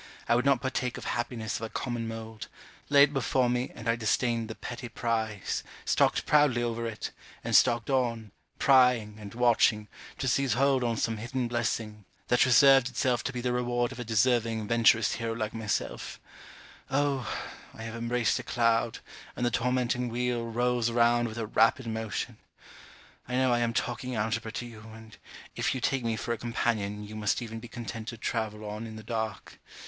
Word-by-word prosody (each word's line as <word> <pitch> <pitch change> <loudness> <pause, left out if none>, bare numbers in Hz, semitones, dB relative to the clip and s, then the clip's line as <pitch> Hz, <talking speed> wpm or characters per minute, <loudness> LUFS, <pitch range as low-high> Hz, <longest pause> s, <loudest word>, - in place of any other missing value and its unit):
I - - +4
would 125 +3 +2
not 140 -3 +3
partake 125 -2 -2
of - - -8
happiness 120 -2 -2
of - - -9
a 115 - -4
common 120 -2 -3
mould; 110 -1 -7 0.4
lay 140 0 +7
it 145 0 +3
before 130 -2 +1
me, 125 +1 -1
and 115 - -8
I 115 - +3
disdained 115 0 0
the 110 - -7
petty 120 0 -7
prize, 110 -4 -2 0.2
stalked - - +2
proudly 145 -5 +4
over 115 0 -2
it, 110 -1 -5 0.3
and - - 0
stalked 120 +2 +4
on, 115 -5 0 0.3
prying, 125 -6 +4
and 105 0 -9
watching, 115 -3 +3 0.3
to 135 - -2
seize 135 +1 +2
hold 135 +1 +2
on 115 -2 0
some 115 0 -1
hidden 120 +3 -2
blessing, 115 -3 -2 0.2
that 120 - +5
reserved 135 +1 +6
itself 125 -1 0
to - - -1
be 125 -2 -4
the 125 0 0
reward 120 0 0
of - - -9
a - - -3
deserving 115 -1 +1
venturous 115 -1 +4
hero 115 -1 -2
like 110 -1 -3
myself 110 -2 -3 0.7
Oh! 135 -2 0 0.4
I 110 - -8
have 115 0 -6
embraced 115 0 0
a - - -6
cloud, 115 -1 +1 0.4
and 120 - -1
the 120 - +1
tormenting 125 0 0
wheel 120 0 -1
rolls 120 0 +1
round 120 0 +3
with 110 0 -7
a 115 - -2
rapid 115 +4 +3
motion! 110 -1 -4 0.9
I 125 - -3
know 130 -1 +3
I 120 - +2
am 120 -1 +1
talking 125 +2 -2
algebra 110 +1 -1
to 120 - -4
you, 115 -2 -10 0.2
and 110 -1 -13 0.4
if - - 0
you - - -2
take 135 0 0
me 115 -1 0
for 115 - -2
a 115 - -5
companion, 110 -3 -1
you 105 +1 -9
must 105 -2 0
even 115 -2 -6
be 120 - -10
content 115 -1 -7
to 115 - -5
travel 110 -2 -3
on 105 +2 -5
in 110 - -9
the 110 - -9
dark. 110 -2 -4
115 Hz, 190 wpm, -29 LUFS, 110-125 Hz, 0.9 s, lay